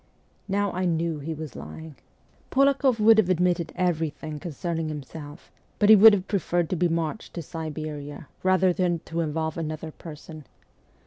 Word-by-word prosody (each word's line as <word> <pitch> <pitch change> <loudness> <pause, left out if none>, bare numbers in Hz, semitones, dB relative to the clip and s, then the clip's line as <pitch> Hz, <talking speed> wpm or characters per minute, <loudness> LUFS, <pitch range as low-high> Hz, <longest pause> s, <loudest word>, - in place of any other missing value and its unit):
Now 200 0 0
I 185 +1 -2
knew 165 -2 0
he 160 +3 -5
was 155 -4 -8
lying. 135 - -9 0.5
Polakoff 275 -3 +3
would 220 +1 +6
have 195 -4 +2
admitted 175 -2 +1
everything 160 -3 -2
concerning 165 0 -3
himself; 150 +1 -9 0.3
but 205 - +3
he 220 - +11
would 215 +1 +9
have 195 -1 -1
preferred 175 -4 -1
to - - +1
be 175 +1 +2
marched 165 +4 -3
to 170 - -4
Siberia 155 -2 -6
rather 185 -1 +3
than 175 -2 0
to 165 - -4
involve 160 0 -2
another 155 0 -5
person. 155 -2 -11
165 Hz, 155 wpm, -25 LUFS, 155-185 Hz, 0.5 s, he